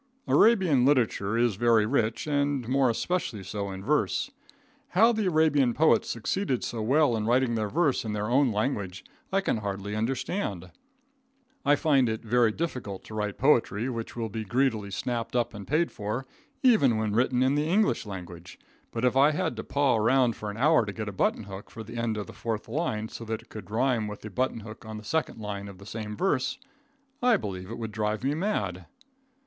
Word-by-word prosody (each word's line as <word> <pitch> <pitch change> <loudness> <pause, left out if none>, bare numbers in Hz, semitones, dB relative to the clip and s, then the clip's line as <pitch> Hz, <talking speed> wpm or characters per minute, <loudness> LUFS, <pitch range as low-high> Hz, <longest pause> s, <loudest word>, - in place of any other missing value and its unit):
Arabian 185 - +4
literature 115 -6 +2
is 120 -4 +2
very 115 -2 +4
rich, 115 -2 0
and 145 -4 0
more 130 0 +3
especially 115 - -2
so 100 +1 -4
in 95 0 -7
verse. 150 - 0 0.7
How 225 +4 +7
the 220 -4 0
Arabian 155 -7 +3
poets 160 +1 +3
succeeded 130 - -1
so 115 - -3
well 130 +2 +3
in 110 -1 -2
writing 125 0 +3
their 110 -2 -1
verse 155 0 +1
in 110 -2 -3
their 105 0 -2
own 130 +1 +3
language, 100 -4 -2 0.3
I 195 +1 +2
can 190 - 0
hardly 100 0 -4
understand. 110 - -2 0.9
I 145 - +5
find 140 -6 +3
it 110 0 -3
very 120 0 +3
difficult 120 - -4
to - - -11
write 105 -1 -2
poetry 120 -4 +2
which 115 -3 -5
will 115 -2 -3
be 110 +2 -4
greedily 115 -2 0
snapped 115 +5 -3
up 120 -1 +1
and 105 -2 -8
paid 160 +4 +1
for, 110 +5 -4 0.4
even 210 - +5
when 110 -1 -1
written 125 +2 +2
in 130 +1 +3
the 150 +1 +1
English 210 +4 +2
language, 90 -4 -9 0.3
but 115 +1 -1
if 125 - +2
I 140 +2 +6
had 160 +1 -1
to - - -4
paw 140 -4 +2
around 120 +1 +3
for 105 - -5
an 105 - -6
hour 150 +1 +4
to 100 -2 -5
get 110 -1 -4
a - - -7
button 95 - 0
hook 100 0 -9
for 115 - -8
the 115 +2 -9
end 115 -2 -1
of 105 - -3
the - - -11
fourth 110 -2 -4
line, 110 -9 -2
so - - -8
that 110 0 -4
it - - -20
would 110 - -8
rhyme 115 0 +1
with 105 0 -7
the 105 - -8
button 125 +1 -1
hook 110 0 -10
in 110 0 -7
the 105 - -9
second 160 +2 -2
line 100 -1 -5
of 100 -2 -10
the 100 - -13
same 105 -1 -6
verse, 145 -9 0 0.6
I 245 -3 +4
believe 95 -3 -6
it 115 - -6
would 110 -2 -5
drive 105 +1 -2
me 140 +2 +1
mad. 100 - -2
115 Hz, 205 wpm, -27 LUFS, 105-140 Hz, 0.9 s, How